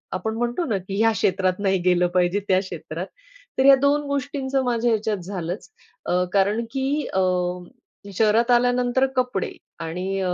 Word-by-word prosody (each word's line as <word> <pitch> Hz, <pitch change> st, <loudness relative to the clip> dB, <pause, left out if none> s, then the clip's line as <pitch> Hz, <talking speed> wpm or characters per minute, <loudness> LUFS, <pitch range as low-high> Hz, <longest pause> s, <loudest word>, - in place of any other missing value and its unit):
आपण 220 Hz, +4 st, -3 dB
म्हणतो 240 Hz, +8 st, -1 dB
ना 220 Hz, -8 st, 0 dB
की 190 Hz, +1 st, -6 dB
ह्या 225 Hz, +1 st, +4 dB
क्षेत्रात 185 Hz, -2 st, 0 dB
नाही 195 Hz, -2 st, +1 dB
गेलं 180 Hz, -1 st, +3 dB
पाहिजे, 180 Hz, +2 st, +2 dB
त्या 185 Hz, -1 st, +4 dB
क्षेत्रात, 190 Hz, -1 st, -6 dB, 0.5 s
तर 265 Hz, -, +3 dB
या 275 Hz, 0 st, +9 dB
2 285 Hz, +1 st, +3 dB
गोष्टींचं 275 Hz, -1 st, -1 dB
माझ्या 240 Hz, -1 st, +1 dB
ह्याच्यात 215 Hz, -1 st, 0 dB
झालंच 180 Hz, 0 st, -5 dB, 0.4 s
अ, 180 Hz, +1 st, +1 dB
कारण 205 Hz, +3 st, +2 dB
की 275 Hz, +3 st, -1 dB
अ, 190 Hz, -, +1 dB, 0.9 s
शहरात 225 Hz, +4 st, +3 dB
आल्यानंतर 245 Hz, +1 st, +3 dB
कपडे 250 Hz, -7 st, -1 dB, 0.3 s
आणि 180 Hz, +4 st, -3 dB
अ, 180 Hz, -1 st, 0 dB
215 Hz, 155 wpm, -23 LUFS, 185-250 Hz, 0.9 s, या